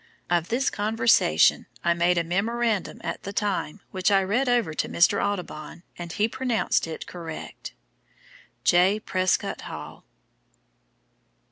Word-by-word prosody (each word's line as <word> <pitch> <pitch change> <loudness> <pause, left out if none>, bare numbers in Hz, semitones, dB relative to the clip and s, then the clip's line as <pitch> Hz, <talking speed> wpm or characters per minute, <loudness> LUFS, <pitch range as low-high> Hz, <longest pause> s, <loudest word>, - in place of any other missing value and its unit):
Of 170 -1 +1
this 250 +3 +1
conversation 225 +2 +3 0.2
I 170 - +3
made 175 +1 +2
a 170 - +2
memorandum 215 +5 -1
at - - -4
the 200 - -6
time 200 -7 -2
which 185 -2 +1
I 195 -1 +4
read 240 +7 +1
over 240 -10 +2
to - - -2
Mr. 175 +4 +3
Audubon 175 -4 -4
and 170 -1 -7
he 210 +6 +1
pronounced 240 -6 0
it 160 - -6
correct. 165 -3 -8 0.9
"J. 185 +4 +4
PRESCOTT 185 -3 0
HALL." - - -9
195 Hz, 130 wpm, -25 LUFS, 175-220 Hz, 0.9 s, I